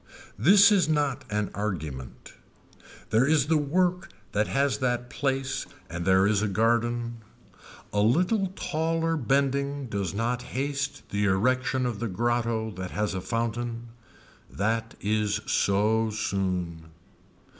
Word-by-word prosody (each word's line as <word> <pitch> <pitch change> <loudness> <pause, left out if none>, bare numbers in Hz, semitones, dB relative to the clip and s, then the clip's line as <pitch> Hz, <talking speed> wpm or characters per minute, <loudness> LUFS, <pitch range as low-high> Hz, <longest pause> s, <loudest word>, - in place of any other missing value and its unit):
This 200 +5 +7
is 185 -7 +3
not 145 -3 0
an 105 -1 -1
argument. 80 - -5 0.8
There 115 +5 +4
is 150 -3 +3
the 155 +1 +2
work 180 +5 0 0.2
that 105 +1 +1
has 140 0 +1
that 120 -1 -1
place 135 -1 -2 0.2
and 85 0 -4
there 95 0 +5
is 105 -1 +2
a 105 - +1
garden. 115 +3 0 0.8
A 105 - +1
little 180 - +2
taller 165 0 0
bending 140 0 0
does 100 -6 -3
not 120 +3 -1 0.2
haste 140 0 -2
the 100 0 +1
erection 130 +6 +1
of 120 -4 -2
the 115 - -2
grotto 115 +1 -1
that 95 -2 -6
has 105 +1 -2
a 95 - -3
fountain. 115 +3 -3 0.6
That 115 +3 -2
is 105 0 0
so 110 +3 +2
soon. 90 -6 -2
115 Hz, 130 wpm, -27 LUFS, 105-140 Hz, 0.8 s, This